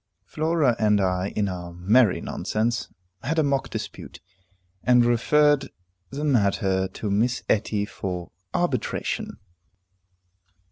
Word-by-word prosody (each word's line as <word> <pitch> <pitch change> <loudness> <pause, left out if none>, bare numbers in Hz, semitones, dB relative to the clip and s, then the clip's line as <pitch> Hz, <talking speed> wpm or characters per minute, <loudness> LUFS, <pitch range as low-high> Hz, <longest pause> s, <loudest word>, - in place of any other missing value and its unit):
Flora 155 -5 +1
and 105 -1 +3
I, 90 -1 0
in 105 -1 +1
our 90 -2 -5
merry 100 +5 +3
nonsense, 115 +2 -2 0.3
had 155 +8 -2
a 160 - +4
mock 140 -1 0
dispute, - - -7 0.6
and 125 -1 +5
referred 145 +4 +3 0.4
the 145 +2 -5
matter 100 -8 +2
to 105 +2 -5
Miss 120 +5 +1
Etty 105 -1 +1
for 90 -4 -5 0.2
arbitration. - - -2
110 Hz, 110 wpm, -25 LUFS, 95-135 Hz, 0.6 s, and